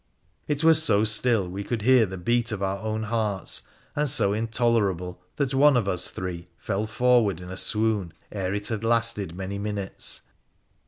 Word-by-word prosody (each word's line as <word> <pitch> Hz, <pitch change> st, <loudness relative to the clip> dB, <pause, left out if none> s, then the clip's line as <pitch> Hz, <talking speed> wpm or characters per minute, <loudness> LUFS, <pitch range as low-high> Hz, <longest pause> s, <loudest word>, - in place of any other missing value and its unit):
It 150 Hz, +1 st, -1 dB
was 160 Hz, -1 st, +6 dB
so 110 Hz, -9 st, +3 dB
still 110 Hz, -2 st, +3 dB
we 95 Hz, +3 st, -5 dB
could 115 Hz, 0 st, -3 dB
hear 125 Hz, -2 st, +5 dB
the 95 Hz, 0 st, -7 dB
beat 120 Hz, +6 st, 0 dB
of 100 Hz, -2 st, -3 dB
our 95 Hz, 0 st, -1 dB
own 110 Hz, +1 st, -3 dB
hearts, 105 Hz, -3 st, -1 dB, 0.3 s
and 150 Hz, 0 st, +1 dB
so 100 Hz, -7 st, +2 dB
intolerable 105 Hz, -6 st, 0 dB
that 140 Hz, -2 st, -1 dB
one 140 Hz, 0 st, +5 dB
of 110 Hz, -5 st, 0 dB
us 90 Hz, -3 st, 0 dB
three 90 Hz, -2 st, -6 dB
fell 95 Hz, +6 st, -2 dB
forward 115 Hz, -5 st, +2 dB
in 90 Hz, 0 st, -9 dB
a -, -, -5 dB
swoon 105 Hz, -3 st, 0 dB, 0.2 s
ere 95 Hz, -3 st, -3 dB
it 105 Hz, +1 st, -3 dB
had 110 Hz, -1 st, -3 dB
lasted 115 Hz, -6 st, 0 dB
many 95 Hz, +2 st, -5 dB
minutes. 100 Hz, -2 st, -2 dB
105 Hz, 175 wpm, -25 LUFS, 95-120 Hz, 0.3 s, was